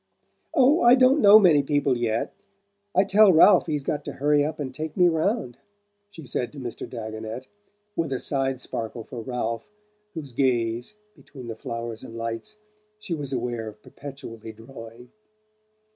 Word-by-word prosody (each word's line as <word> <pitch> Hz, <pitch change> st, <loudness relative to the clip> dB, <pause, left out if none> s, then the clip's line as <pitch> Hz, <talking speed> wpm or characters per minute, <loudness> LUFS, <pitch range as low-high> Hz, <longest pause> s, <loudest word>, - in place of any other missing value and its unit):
"Oh, 280 Hz, +6 st, +5 dB
I 240 Hz, +1 st, +7 dB
don't 260 Hz, +3 st, +4 dB
know 205 Hz, +1 st, +9 dB
many 175 Hz, -9 st, +5 dB
people 140 Hz, -1 st, +1 dB
yet 115 Hz, -2 st, -1 dB, 0.6 s
I 190 Hz, -, +5 dB
tell 200 Hz, +1 st, +6 dB
Ralph 180 Hz, +3 st, +6 dB
he's 150 Hz, -3 st, -2 dB
got 145 Hz, -, -2 dB
to -, -, -5 dB
hurry 145 Hz, +1 st, +2 dB
up 155 Hz, +1 st, -3 dB
and 135 Hz, -3 st, -4 dB
take 155 Hz, +5 st, -6 dB
me 180 Hz, -1 st, +6 dB
round," 160 Hz, -, -1 dB, 0.5 s
she 165 Hz, -7 st, -12 dB
said 125 Hz, -1 st, -3 dB
to 145 Hz, -, -9 dB
Mr. 120 Hz, -3 st, -6 dB
Dagonet, 110 Hz, +1 st, -6 dB, 0.5 s
with 165 Hz, -4 st, -1 dB
a 130 Hz, -, 0 dB
side 135 Hz, -1 st, -1 dB
sparkle 115 Hz, -2 st, -5 dB
for 120 Hz, +1 st, -8 dB
Ralph, 120 Hz, -, -4 dB, 0.5 s
whose 145 Hz, -5 st, -7 dB
gaze, 120 Hz, -, 0 dB, 0.2 s
between 135 Hz, -4 st, -12 dB
the 115 Hz, -, -5 dB
flowers 115 Hz, +1 st, -6 dB
and 115 Hz, -3 st, -9 dB
lights, 115 Hz, -, -5 dB, 0.4 s
she 215 Hz, -5 st, -5 dB
was 145 Hz, -4 st, -4 dB
aware 120 Hz, -3 st, -3 dB
of 105 Hz, 0 st, -11 dB
perpetually 115 Hz, -6 st, -9 dB
drawing. 115 Hz, +1 st, -12 dB
135 Hz, 160 wpm, -25 LUFS, 115-160 Hz, 0.6 s, know